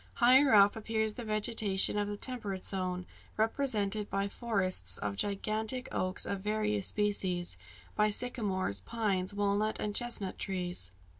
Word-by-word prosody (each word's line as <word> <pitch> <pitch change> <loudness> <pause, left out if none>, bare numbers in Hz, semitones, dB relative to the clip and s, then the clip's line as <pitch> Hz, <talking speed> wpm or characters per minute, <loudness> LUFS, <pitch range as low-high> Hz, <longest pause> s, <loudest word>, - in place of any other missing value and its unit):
Higher 260 +3 +5
up 200 0 +6
appears 220 -1 -2
the 240 - -7
vegetation 215 -3 +2
of 205 0 -1
the 205 0 -5
temperate 205 -7 -1
zone, 185 -2 -2 0.3
represented 215 -3 0
by 195 0 -1
forests 185 - +1
of 100 -1 -4
gigantic 215 - -2
oaks 185 +1 -1
of 200 - -3
various 210 -1 -1
species, 190 -4 +3 0.4
by 210 0 +3
sycamores, 205 - 0
pines, 195 - -2
walnut, 205 +1 -1
and 210 - -3
chestnut 235 -5 -2
trees. 180 - -3
205 Hz, 135 wpm, -31 LUFS, 190-220 Hz, 0.4 s, up